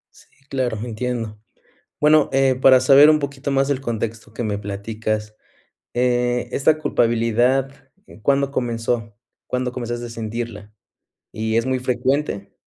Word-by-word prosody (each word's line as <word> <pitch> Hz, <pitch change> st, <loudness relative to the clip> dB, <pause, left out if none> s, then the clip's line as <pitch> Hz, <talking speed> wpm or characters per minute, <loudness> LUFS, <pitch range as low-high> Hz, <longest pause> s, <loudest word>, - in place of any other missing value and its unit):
Sí, -, -, -19 dB, 0.2 s
claro. 125 Hz, -4 st, -1 dB
Entiendo. 115 Hz, -2 st, -4 dB, 0.6 s
Bueno, 150 Hz, 0 st, +5 dB
eh, 135 Hz, -1 st, +3 dB
para 130 Hz, 0 st, +6 dB
saber 140 Hz, +3 st, +7 dB
un 155 Hz, -, +4 dB
poquito 140 Hz, -1 st, -4 dB
más 135 Hz, 0 st, +2 dB
del 140 Hz, -2 st, 0 dB
contexto 115 Hz, -3 st, -4 dB
que 115 Hz, -, -4 dB
me 105 Hz, -2 st, -2 dB
platicas, 105 Hz, +1 st, -4 dB, 0.6 s
eh, 125 Hz, 0 st, +1 dB
esta 155 Hz, +3 st, +2 dB
culpabilidad, 120 Hz, +1 st, +1 dB, 0.5 s
¿cuándo 140 Hz, +2 st, +2 dB
comenzó? 115 Hz, -3 st, -2 dB, 0.3 s
¿Cuándo 125 Hz, 0 st, -2 dB
comenzaste 120 Hz, -1 st, -4 dB
a -, -, -8 dB
sentirla? 115 Hz, -2 st, -6 dB, 0.6 s
¿Y 110 Hz, 0 st, -2 dB
es 115 Hz, -, +1 dB
muy 130 Hz, 0 st, 0 dB
frecuente? 125 Hz, -4 st, -1 dB
120 Hz, 135 wpm, -21 LUFS, 110-135 Hz, 0.6 s, saber